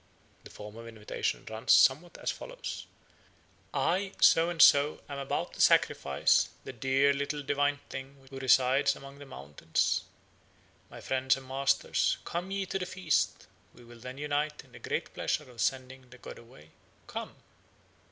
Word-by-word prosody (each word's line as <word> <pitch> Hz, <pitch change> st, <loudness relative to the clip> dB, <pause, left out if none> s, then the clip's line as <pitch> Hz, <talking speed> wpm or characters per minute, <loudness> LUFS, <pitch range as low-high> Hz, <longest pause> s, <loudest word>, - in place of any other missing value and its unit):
The -, -, -12 dB
form 105 Hz, +1 st, -11 dB
of 115 Hz, 0 st, -9 dB
invitation 110 Hz, -2 st, -4 dB
runs 110 Hz, +3 st, +1 dB
somewhat 150 Hz, +7 st, +4 dB
as -, -, -2 dB
follows: -, -, -7 dB, 0.8 s
"I, 190 Hz, +3 st, 0 dB
so 165 Hz, +1 st, +5 dB
and 175 Hz, -2 st, -5 dB
so, 145 Hz, 0 st, +6 dB
am 140 Hz, -1 st, -6 dB
about 135 Hz, -, -3 dB
to -, -, -4 dB
sacrifice 70 Hz, -1 st, +3 dB
the -, -, -8 dB
dear 135 Hz, +3 st, +2 dB
little 145 Hz, +1 st, -3 dB
divine 145 Hz, +1 st, 0 dB
thing 135 Hz, +1 st, -9 dB
who 135 Hz, -, -7 dB
resides 130 Hz, +1 st, +3 dB
among 140 Hz, +1 st, -12 dB
the 145 Hz, -, -11 dB
mountains. 80 Hz, -, -1 dB, 0.9 s
My -, -, -11 dB
friends 130 Hz, 0 st, +1 dB
and 135 Hz, -1 st, -12 dB
masters, 135 Hz, +1 st, +1 dB
come 175 Hz, +2 st, -4 dB
ye 195 Hz, 0 st, -2 dB
to 195 Hz, +1 st, -3 dB
the 180 Hz, -, -4 dB
feast; 180 Hz, -6 st, 0 dB, 0.3 s
we 120 Hz, -, -16 dB
will 120 Hz, 0 st, -14 dB
then 125 Hz, +3 st, -8 dB
unite 150 Hz, +1 st, -2 dB
in -, -, -23 dB
the -, -, -13 dB
great -, -, -4 dB
pleasure 150 Hz, -, -2 dB
of 120 Hz, -, -7 dB
sending 130 Hz, -1 st, -2 dB
the 125 Hz, -, -14 dB
god -, -, -10 dB
away. 95 Hz, -10 st, -17 dB, 0.3 s
Come." -, -, -7 dB
135 Hz, 160 wpm, -30 LUFS, 125-150 Hz, 0.9 s, so